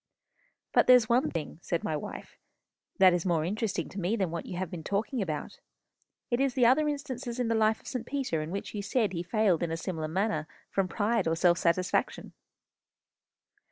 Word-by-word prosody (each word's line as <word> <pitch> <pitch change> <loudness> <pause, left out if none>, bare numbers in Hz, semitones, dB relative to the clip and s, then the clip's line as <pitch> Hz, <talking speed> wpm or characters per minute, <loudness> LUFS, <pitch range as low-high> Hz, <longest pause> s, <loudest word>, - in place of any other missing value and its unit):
"But - - +4
there's 250 -3 +7
one 250 +6 +3
thing," 160 -1 -5
said 170 - -2
my 155 - -1
wife, 150 - -7 0.6
"that 185 -2 +7
is 175 -1 0
more 165 -4 +1
interesting 200 -2 -2
to 200 - -7
me 190 +5 0
than 190 -7 -1
what 170 -1 -5
you 180 - -5
have 185 -2 -3
been 170 -3 -6
talking 215 - -1
about. 155 -6 -4 0.7
It 240 - +2
is 270 -2 +1
the 250 -3 +4
other 280 +6 +4
instances 260 -4 -4
in 245 -2 0
the - - +2
life 220 0 +2
of - - -16
St. 245 -3 -4
Peter 260 - -1
in 155 - -5
which 195 +3 -5
you 205 - -3
said 210 -1 0
he 170 - -2
failed 195 -2 +1
in 170 - -1
a 165 - -2
similar 160 -2 -3
manner 165 -2 -1 0.2
from 195 -1 +1
pride 210 +1 0
or 165 - +2
self 175 +1 +3
satisfaction." 180 +2 0
195 Hz, 200 wpm, -29 LUFS, 170-235 Hz, 0.7 s, there's